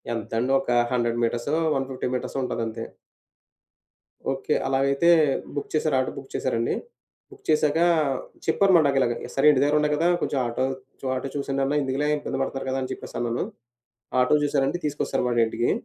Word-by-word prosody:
ఎంతండి 115 +3 -2
ఒక 135 - -3 0.2
100 120 -1 0
మీటర్సో, 120 +5 0 0.2
150 135 -1 -2
మీటర్సో, 125 +2 -3
ఉంటదంతే. 115 -2 -3 1.5
ఓకే. - - -1
అలాగైతే 140 +4 +2 0.5
బుక్ 145 - -4
చేశారు, 155 -2 +1
ఆటో 130 - -1
బుక్ 135 - -9
చేశారండి. 115 -3 0 0.6
బుక్ - - -16
చేశాక, 155 0 +3 0.7
చెప్పారు 195 -1 +3
మాట 165 - +6
నాకు 140 -1 +1
ఇలాగ. 120 -2 +2 0.2
సరే, 135 - +2
ఇంటి 135 -3 +2
దగ్గర 145 +1 +2
ఉండా 150 0 +1
కదా, 165 +3 +2
కొంచెం 140 - 0
ఆటో 120 +2 -1 0.4
చో - - -8
ఆటో 130 - -3
చూసేయండన్నా 140 0 -1
ఎందుకులే 135 +2 -1
ఇబ్బంది 135 -2 -4
పడతారు 135 0 -3
కదా 130 +1 -1
అని 130 - -4
చెప్పేసి - - -8
అన్నాను. 120 0 -1 0.8
ఆటో 125 +3 +4
చూశారండి, 140 +3 +1
తీసుకొస్తారు 145 -3 -1
వాడింటికి. 120 0 +1
135 Hz, 155 wpm, -25 LUFS, 120-145 Hz, 1.5 s, మాట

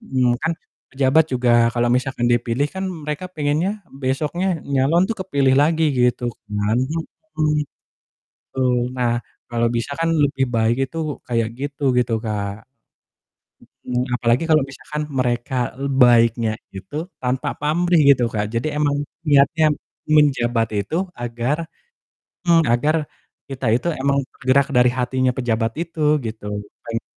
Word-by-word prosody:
Mmm, 130 - +1
kan 165 0 -1 0.3
pejabat 135 +4 +3
juga 125 -3 +1 0.3
kalau 120 0 +2
misalkan 125 -1 0
dipilih 120 +2 +1
kan 190 0 -4
mereka 155 0 -5
pengennya 175 +5 -1
besoknya 140 +7 -2 0.3
nyalon 140 +7 +3
tuh 220 - -1
kepilih 140 -8 +1
lagi 160 +2 +2
gitu 125 -1 +1 0.2
kan. 105 +1 0 0.6
Mhm. 150 -1 +2 0.9
Betul, 130 -2 +1 0.2
nah 125 -2 0 0.4
kalau 120 0 +1
bisa 120 +4 -3
kan 165 - +2
lebih 145 -4 +2
baik 115 0 +2 0.2
itu - - -9 0.3
kayak 115 -2 0
gitu 145 +1 -6 0.2
gitu 120 -1 +1
Kak. 105 -1 -4 1.2
Mhm, 125 0 +1
apalagi 120 +3 +2
kalau 155 -1 +5
misalkan 150 +2 -6 0.2
mereka, 120 0 -1
eee, 140 - -1
baiknya 115 -2 +4 0.2
itu 95 +9 -9 0.3
tanpa 130 0 -1
pamrih 170 +3 +2
gitu 125 - -2
Kak 105 -1 0
jadi 115 +6 -1
emang 145 -1 +1 0.3
niatnya 145 +2 +4 0.5
menjabat 120 -6 +3 0.2
itu 155 - -4 0.2
agar 120 +4 -2 0.9
mmm, 170 -1 +5
agar 150 +6 +2 0.5
kita 135 -1 -5
itu 125 - -2
emang 140 0 +2
bergerak 130 +2 +2
dari 125 0 +6
hatinya 130 +1 +1
pejabat 115 -2 0
itu 170 -2 -6 0.2
gitu, 110 -1 -6 0.4
pengen 115 0 -3
130 Hz, 135 wpm, -21 LUFS, 120-150 Hz, 1.2 s, dari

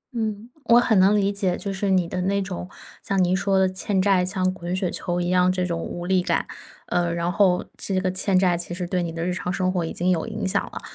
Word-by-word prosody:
嗯， 220 -1 -3 0.2
我 235 0 +6
很 220 -4 +3
能 195 +3 +5
理 200 -1 +2
解。 195 -3 -1
就 200 -2 -4
是 195 +1 -2
你 185 -2 +2
的 180 +2 -3
那 200 +2 +1
种， 185 -1 -6 0.3
像 195 -1 0
您 180 +1 +2
说 195 0 +1
的 190 0 +4
欠 190 +1 -1
债， 190 -1 +3
像 185 0 0
滚 175 -1 -4
雪 185 -1 -1
球 175 0 -2
一 175 0 -1
样 180 0 +3
这 185 -1 -1
种 170 -2 -2
无 175 +1 -6
力 185 0 +2
感。 - - 0 0.4
呃， 175 -1 0
然 170 +1 -1
后 185 -2 +2
这 190 -2 -1
个 185 -1 -1
欠 185 +1 +1
债 185 -2 +3
其 175 0 -5
实 180 0 -3
对 180 +1 -1
你 170 -1 -3
的 165 +1 -4
日 180 - -1
常 180 -1 -3
生 185 0 0
活 180 -2 0
已 165 - -4
经 180 +2 0
有 170 +1 0
影 215 -3 -3
响 200 +1 +1
了。 - - -8
185 Hz, 280 characters per minute, -23 LUFS, 180-195 Hz, 0.4 s, 我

